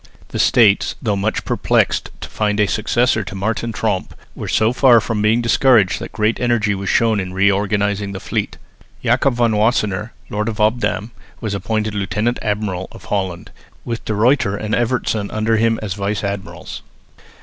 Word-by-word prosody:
The -, -, -5 dB
States, 110 Hz, -6 st, +4 dB
though 105 Hz, -5 st, -1 dB
much 100 Hz, +3 st, -2 dB
perplexed -, -, +1 dB
to -, -, -6 dB
find 105 Hz, -1 st, -1 dB
a 105 Hz, -, +5 dB
successor 110 Hz, +3 st, +1 dB
to 95 Hz, -, -8 dB
Martin 110 Hz, +4 st, -2 dB
Tromp, 105 Hz, -4 st, -2 dB, 0.2 s
were -, -, -7 dB
so 110 Hz, +2 st, +2 dB
far 125 Hz, -2 st, +6 dB
from 110 Hz, -1 st, -2 dB
being 110 Hz, +3 st, +3 dB
discouraged 115 Hz, -4 st, +3 dB
that -, -, -7 dB
great 110 Hz, +1 st, 0 dB
energy 120 Hz, -4 st, +1 dB
was 95 Hz, -1 st, -4 dB
shown 115 Hz, -2 st, +2 dB
in 90 Hz, -1 st, -5 dB
reorganising 100 Hz, +1 st, +1 dB
the 95 Hz, -, -6 dB
fleet. -, -, -3 dB, 0.5 s
Jacob 125 Hz, +2 st, +2 dB
van 120 Hz, -1 st, +2 dB
Wassenaer, 105 Hz, -1 st, +1 dB, 0.2 s
lord 105 Hz, +2 st, -1 dB
of 110 Hz, -, -6 dB
Obdam, 110 Hz, -1 st, 0 dB, 0.3 s
was 110 Hz, -3 st, -3 dB
appointed 105 Hz, +2 st, -2 dB
lieutenant 105 Hz, +4 st, -1 dB
admiral 105 Hz, -4 st, -2 dB
of -, -, -13 dB
Holland, 95 Hz, -4 st, -3 dB, 0.3 s
with 115 Hz, -1 st, -4 dB
De 110 Hz, -, -2 dB
Ruyter 110 Hz, -2 st, +2 dB
and 110 Hz, +1 st, -4 dB
Evertsen 115 Hz, -3 st, 0 dB
under 110 Hz, +1 st, 0 dB
him 115 Hz, 0 st, +2 dB
as 100 Hz, -3 st, -2 dB
vice 100 Hz, +1 st, -2 dB
admirals. 100 Hz, -1 st, -5 dB
105 Hz, 170 wpm, -19 LUFS, 100-115 Hz, 0.5 s, far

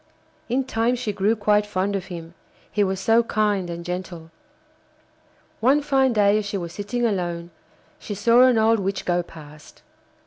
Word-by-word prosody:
In 260 Hz, +3 st, +1 dB
time 235 Hz, -1 st, 0 dB
she 240 Hz, -4 st, -3 dB
grew 205 Hz, +3 st, +1 dB
quite 210 Hz, -1 st, +2 dB
fond 200 Hz, -1 st, -2 dB
of 190 Hz, -2 st, -3 dB
him, 170 Hz, -2 st, -8 dB, 0.4 s
he 205 Hz, -, +1 dB
was 190 Hz, -1 st, -1 dB
so 225 Hz, +3 st, +4 dB
kind 210 Hz, -5 st, 0 dB
and 170 Hz, 0 st, -6 dB
gentle. 180 Hz, -2 st, -6 dB, 1.3 s
One 275 Hz, +5 st, +3 dB
fine 270 Hz, -2 st, +2 dB
day 210 Hz, -1 st, +3 dB
as 210 Hz, -, -4 dB
she 205 Hz, -, -3 dB
was 170 Hz, -2 st, -6 dB
sitting 225 Hz, +5 st, -2 dB
alone 175 Hz, -5 st, -2 dB, 0.5 s
she 205 Hz, -, -6 dB
saw 230 Hz, +4 st, +4 dB
an 255 Hz, -2 st, +5 dB
old 220 Hz, 0 st, +3 dB
witch 195 Hz, 0 st, -3 dB
go 175 Hz, 0 st, +1 dB
past. 155 Hz, -3 st, -14 dB
205 Hz, 170 wpm, -23 LUFS, 180-225 Hz, 1.3 s, an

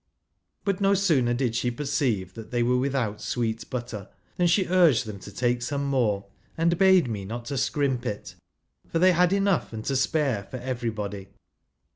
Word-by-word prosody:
But 200 Hz, -1 st, 0 dB
no 200 Hz, 0 st, +4 dB
sooner 145 Hz, -12 st, +2 dB
did 120 Hz, -2 st, 0 dB
she 125 Hz, -, 0 dB
i 120 Hz, -, -6 dB
perceive 125 Hz, -, -1 dB
that 110 Hz, -1 st, -9 dB
they 120 Hz, -1 st, +1 dB
wei*e 125 Hz, +1 st, +2 dB
without 125 Hz, -6 st, -1 dB
sweet 115 Hz, -2 st, -2 dB
butter 120 Hz, -5 st, -5 dB
i -, -, -36 dB, 0.2 s
than 175 Hz, -, +3 dB
she 185 Hz, +3 st, +3 dB
urged 175 Hz, -10 st, +4 dB
them 105 Hz, -2 st, -7 dB
to 105 Hz, -, -10 dB
take 120 Hz, +3 st, 0 dB
some 140 Hz, +3 st, -2 dB
more, 115 Hz, -8 st, +1 dB, 0.3 s
and 170 Hz, +1 st, +2 dB
bade 190 Hz, -5 st, +5 dB
me 105 Hz, -4 st, -4 dB
not 120 Hz, +4 st, -6 dB
scrimp 135 Hz, -2 st, 0 dB
it, 105 Hz, -3 st, -5 dB, 0.5 s
for -, -, -2 dB
they 185 Hz, +2 st, +5 dB
had 180 Hz, 0 st, +3 dB
enough 195 Hz, -, +1 dB
and 110 Hz, 0 st, -6 dB
to 140 Hz, -, 0 dB
spai'e 135 Hz, -, 0 dB
for 130 Hz, -, -5 dB
everybody. 110 Hz, -6 st, -4 dB
125 Hz, 185 wpm, -26 LUFS, 110-160 Hz, 0.5 s, bade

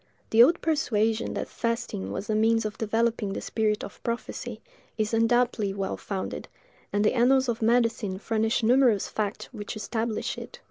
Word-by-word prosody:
The 225 Hz, -, +7 dB
old 330 Hz, +8 st, +6 dB
persuasion 225 Hz, -8 st, 0 dB
that -, -, -3 dB
fasting 230 Hz, -, -3 dB
was 195 Hz, -, -4 dB
a 215 Hz, -, 0 dB
means 225 Hz, +1 st, +3 dB
of 215 Hz, -, -3 dB
developing 225 Hz, -2 st, 0 dB
the -, -, -3 dB
spirit 215 Hz, -1 st, -1 dB
of 200 Hz, -, -9 dB
prophecy, 235 Hz, 0 st, -4 dB, 0.4 s
is 215 Hz, 0 st, -1 dB
undoubtedly 225 Hz, -3 st, +2 dB
well 195 Hz, -1 st, -2 dB
founded, 195 Hz, -2 st, -5 dB, 0.4 s
and 205 Hz, +1 st, +1 dB
the -, -, +3 dB
annals 260 Hz, +2 st, +4 dB
of 235 Hz, -1 st, -2 dB
medicine 225 Hz, -4 st, +2 dB
furnish 225 Hz, +2 st, 0 dB
numerous 240 Hz, -3 st, +4 dB
facts 210 Hz, -2 st, -3 dB
which 210 Hz, -2 st, -6 dB
establish 220 Hz, +1 st, -2 dB
it. -, -, -10 dB
225 Hz, 165 wpm, -27 LUFS, 210-235 Hz, 0.4 s, The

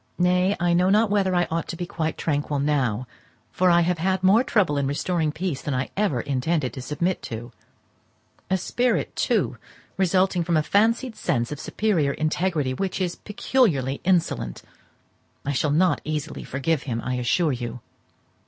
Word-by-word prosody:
Nay, 180 Hz, +2 st, +3 dB
I 175 Hz, 0 st, +2 dB
know 180 Hz, +2 st, +3 dB
not 210 Hz, +1 st, +3 dB
whether 195 Hz, -3 st, +2 dB
I 175 Hz, 0 st, +3 dB
ought 165 Hz, +1 st, -1 dB
to -, -, -5 dB
be 175 Hz, -, -4 dB
quite 160 Hz, -2 st, -3 dB
tranquil 145 Hz, -1 st, -1 dB
now, 135 Hz, -5 st, 0 dB, 0.5 s
for 185 Hz, 0 st, +2 dB
I 175 Hz, 0 st, +5 dB
have 175 Hz, 0 st, 0 dB
had 190 Hz, +2 st, 0 dB
more 205 Hz, +6 st, +5 dB
trouble 200 Hz, -, +2 dB
in 140 Hz, -, 0 dB
restoring 155 Hz, +2 st, 0 dB
peace 160 Hz, -2 st, -3 dB
than 145 Hz, -, -2 dB
I 130 Hz, +1 st, -2 dB
ever 195 Hz, -, +1 dB
intended 140 Hz, +1 st, -1 dB
to 130 Hz, -, -6 dB
submit 170 Hz, +7 st, -1 dB
to—a 120 Hz, +9 st, -8 dB
spirit, 245 Hz, +7 st, 0 dB
too, -, -, 0 dB, 0.4 s
resulting 185 Hz, -1 st, +2 dB
from 170 Hz, -1 st, +1 dB
a 155 Hz, -, +2 dB
fancied 225 Hz, -, +2 dB
sense 120 Hz, +2 st, -1 dB
of 150 Hz, -, -5 dB
superior 165 Hz, -11 st, 0 dB
integrity, 155 Hz, -3 st, 0 dB
which 195 Hz, +7 st, -2 dB
is 180 Hz, -2 st, -1 dB
peculiarly 205 Hz, -, 0 dB
insolent! 170 Hz, -, 0 dB, 0.8 s
I 145 Hz, -, 0 dB
shall 145 Hz, +2 st, 0 dB
not 170 Hz, +5 st, +2 dB
easily 155 Hz, 0 st, -4 dB
forgive 140 Hz, +2 st, -1 dB
him, 115 Hz, -1 st, -1 dB
I 125 Hz, -, -1 dB
assure 145 Hz, +7 st, +1 dB
you. 120 Hz, -1 st, -5 dB
165 Hz, 165 wpm, -24 LUFS, 140-185 Hz, 0.8 s, I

